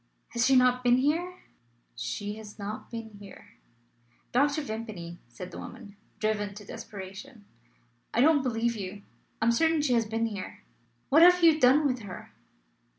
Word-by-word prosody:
"Has 235 +1 +1
she 270 - +5
not 250 0 +4
been 245 0 +5
here?" 335 +7 -1 0.5
"She 160 - -4
has 215 -1 -11
not 210 +1 -6
been 230 -1 -7
here." 200 -1 -14 0.7
"Dr. 285 +4 +2
Vimpany," 215 -8 -6
said 120 +10 -9
the - - -8
woman, 200 0 -10 0.2
driven 205 -2 -1
to 210 0 -10
desperation, 200 +3 -9 0.7
"I - - -1
don't 300 +1 +5
believe 235 -2 0
you! 200 0 -7 0.4
I - - +3
am 235 - +5
certain 320 +4 +2
she 265 -4 +2
has 230 -2 +2
been 225 +1 -1
here. 205 -4 -6 0.5
What 310 +4 +6
have 360 +1 +7
you 320 -2 +6
done 270 +4 +5
with 255 -3 +1
her?" 200 -5 -9
230 Hz, 160 wpm, -28 LUFS, 205-270 Hz, 0.7 s, have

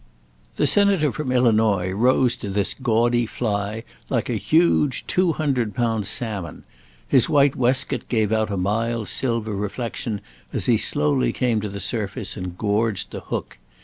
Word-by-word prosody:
The - - +1
Senator 200 -7 +3
from 150 -4 -4
Illinois 110 -7 +2
rose 125 +4 +2
to 100 - -6
this 100 0 0
gaudy 120 -1 +1
fly 105 -1 -3 0.3
like - - -1
a - - 0
huge, 155 -5 +2
two 180 -2 +1
hundred 130 -10 -1
pound 115 -4 0
salmon; 105 -8 -2 0.4
his 130 -4 +3
white 140 -2 +4
waistcoat 130 +1 0
gave 110 -3 +1
out 110 -1 +1
a 100 - -2
mild 110 +3 -1
silver 115 -2 -1
reflection 105 +1 -3 0.3
as - - -1
he - - +3
slowly 70 -5 +1
came 120 -4 0
to 105 - -4
the 100 0 -6
surface 100 +1 -2
and 90 -2 -6
gorged 105 -1 0
the - - -5
hook. - - -6
115 Hz, 155 wpm, -22 LUFS, 100-125 Hz, 0.4 s, white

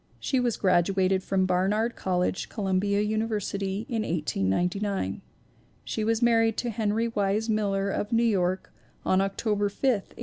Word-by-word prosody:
She 265 - 0
was 245 -3 0
graduated 190 0 +2
from 190 0 +1
Barnard 200 +6 +1
College, 180 0 -1
Columbia 200 -1 0
Uni 215 +1 0
versity, 200 -1 -3
in 230 -5 -1
1899. 175 - -1 0.6
She 220 - -3
was 225 +2 +1
married 225 -1 +3
to 240 - -1
Henry 220 +1 0
Wise 210 +1 0
Miller 200 -2 0
of 205 +3 -3
New 230 0 +3
York 190 -5 0 0.3
on 185 0 +3
October 205 +1 0
5, 200 - -22
1899. 245 -7 +1
205 Hz, 145 wpm, -27 LUFS, 190-225 Hz, 0.6 s, married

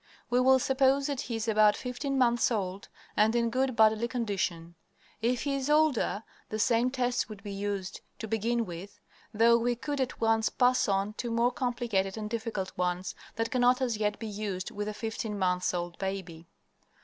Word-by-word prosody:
We 245 - +4
will 260 +1 +6
suppose 265 +1 +2
that 280 -2 -2
he 235 - -4
is 225 0 -3
about 215 -1 +5
fifteen 265 +2 -3
months 240 -2 +3
old 195 -4 -3 0.3
and 215 +2 +3
in 235 -1 +1
good 260 0 0
bodily 220 +1 +4
condition. 190 -8 -2 0.5
If 240 +1 +1
he 280 - -1
is 275 0 -2
older, 300 -8 +2 0.3
the 215 - -3
same 230 +3 +3
tests 250 -2 -1
would 205 -2 -10
be 205 - -6
used 200 -1 -4 0.2
to 220 - -6
begin 230 +2 0
with, 175 +2 -9 0.3
though 230 +2 +5
we 240 +1 +1
could 285 +3 -3
at 260 - -3
once 225 -1 +2
pass 250 0 +3
on 195 +1 0
to 240 - -2
more 235 +2 +2
complicated 235 -6 -1
and 215 0 -5
difficult 220 -4 -3
ones 180 0 -1 0.2
that 225 0 -2
cannot 250 0 +3
as 245 -4 0
yet 210 -1 0
be 225 - -6
used 205 -3 -4
with 205 0 -4
the 215 - -3
fifteen 220 -1 -4
months 180 -1 +1
old 175 -1 -4
baby. 190 -4 -5
225 Hz, 185 wpm, -29 LUFS, 200-245 Hz, 0.5 s, will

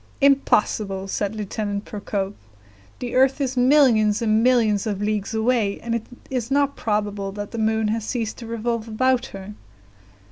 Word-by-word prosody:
"Impossible!" 210 -8 +2
said 200 +2 -2
Lieutenant 205 -1 -3
Procope; 200 -1 -3 0.6
"the 245 -1 -5
earth 265 +2 +3
is 265 -2 -1
millions 245 -5 +4
and 220 -2 +2
millions 225 -5 +3
of 205 -2 -2
leagues 210 +1 -2
away, 220 -3 +1
and 230 0 -3
it 230 -1 -3 0.2
is 250 -3 -2
not 280 0 +2
probable 205 -2 -2
that 205 0 -6
the 230 - -4
moon 220 0 +1
has 225 0 -1
ceased 225 -1 -3
to 235 - -8
revolve 230 0 -2
about 255 +3 +1
her." 195 +1 -9
220 Hz, 155 wpm, -23 LUFS, 205-245 Hz, 0.6 s, millions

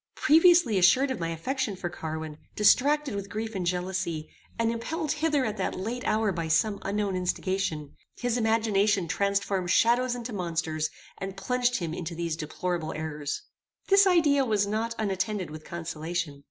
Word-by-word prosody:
Previously 320 - +5
assured 260 +9 +5
of 260 - -3
my 165 -1 -2
affection 220 - -2
for 185 -1 -4
Carwin, 160 -2 -6 0.2
distracted 280 +6 +4
with 200 0 -5
grief 220 +2 -4
and 185 -3 -2
jealousy, 180 -3 -2 0.3
and 230 0 +1
impelled 305 +7 -3
hither 300 -3 +1
at 215 -1 -3
that 190 - -2
late 230 +7 -4
hour 215 -1 +2
by 170 -3 -3
some 200 +6 +2
unknown 200 -1 -1
instigation, 180 -4 -2 0.2
his 245 -1 -1
imagination 215 -5 +2
transformed 200 +1 0
shadows 240 +5 +3
into 240 -1 -6
monsters, 165 -4 -2 0.3
and 195 0 -5
plunged 250 +2 0
him 165 -3 -3
into 170 0 -5
these 170 -1 -2
deplorable 160 +1 -3
errors. 150 -2 -4 0.5
This 395 0 +6
idea 305 -6 +4
was 210 -5 +1
not 220 +3 -2
unattended 195 -3 -2
with 155 0 -9
consolation. 165 -2 -4
200 Hz, 155 wpm, -27 LUFS, 170-235 Hz, 0.5 s, This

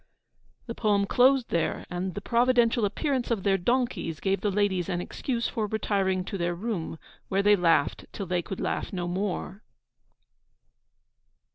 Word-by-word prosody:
The 230 - -5
poem 205 -3 +2
closed 255 +3 +4
there, 170 - -1
and 180 +1 -4
the 205 - -4
providential 235 -1 +3
appearance 255 +5 -1
of 225 -5 -1
their 195 -1 +2
donkeys 240 -6 -1
gave 195 0 0
the 210 - +1
ladies 195 -3 0
an 175 -2 -1
excuse 235 +6 -2
for 220 -2 -2
retiring 195 -3 0
to 195 -1 -5
their 175 0 0
room, 180 -5 -4 0.3
where 195 +1 +1
they 205 0 +6
laughed 165 -6 +2
till 200 - -5
they 180 0 0
could 190 +2 -6
laugh - - -2
no 175 -2 -3
more. 190 +2 -3
200 Hz, 155 wpm, -27 LUFS, 180-230 Hz, 0.3 s, they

